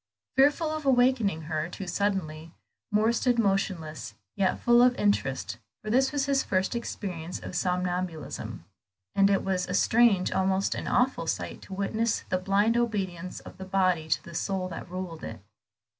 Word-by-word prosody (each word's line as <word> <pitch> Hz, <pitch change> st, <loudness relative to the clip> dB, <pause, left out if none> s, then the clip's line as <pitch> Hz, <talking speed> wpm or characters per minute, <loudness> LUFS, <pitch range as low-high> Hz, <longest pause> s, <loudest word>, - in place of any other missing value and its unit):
Fearful 295 Hz, +4 st, +4 dB
of 310 Hz, 0 st, -3 dB
awakening 245 Hz, -, +3 dB
her 155 Hz, +1 st, -2 dB
too 195 Hz, -, -7 dB
suddenly, 170 Hz, -5 st, -2 dB, 0.4 s
Moor 215 Hz, +2 st, +3 dB
stood 245 Hz, +1 st, +1 dB
motionless, 175 Hz, -, -1 dB, 0.2 s
yet 190 Hz, -2 st, +1 dB
full 240 Hz, 0 st, +5 dB
of 250 Hz, 0 st, +5 dB
interest, 135 Hz, -, 0 dB, 0.2 s
for 215 Hz, -, -3 dB
this 265 Hz, +3 st, +3 dB
was 285 Hz, -2 st, 0 dB
his 275 Hz, -1 st, +2 dB
first 190 Hz, +4 st, 0 dB
experience 180 Hz, -7 st, -4 dB
of -, -, -8 dB
somnambulism, 180 Hz, -2 st, -2 dB, 0.5 s
and 195 Hz, 0 st, +4 dB
it 195 Hz, -, +2 dB
was 185 Hz, -2 st, -1 dB
a -, -, -2 dB
strange, 225 Hz, -5 st, +4 dB
almost 190 Hz, +1 st, +1 dB
an -, -, -5 dB
awful 255 Hz, +2 st, +1 dB
sight, -, -, -3 dB
to 190 Hz, -, -8 dB
witness 220 Hz, +3 st, 0 dB
the 185 Hz, -, +1 dB
blind 200 Hz, +4 st, +2 dB
obedience 190 Hz, -7 st, -2 dB
of -, -, -13 dB
the -, -, -5 dB
body 185 Hz, -4 st, +1 dB
to -, -, +1 dB
the 170 Hz, -, -11 dB
soul 185 Hz, +2 st, -1 dB
that 170 Hz, +1 st, -7 dB
ruled 180 Hz, -3 st, -6 dB
it. -, -, -6 dB
195 Hz, 165 wpm, -28 LUFS, 180-230 Hz, 0.5 s, full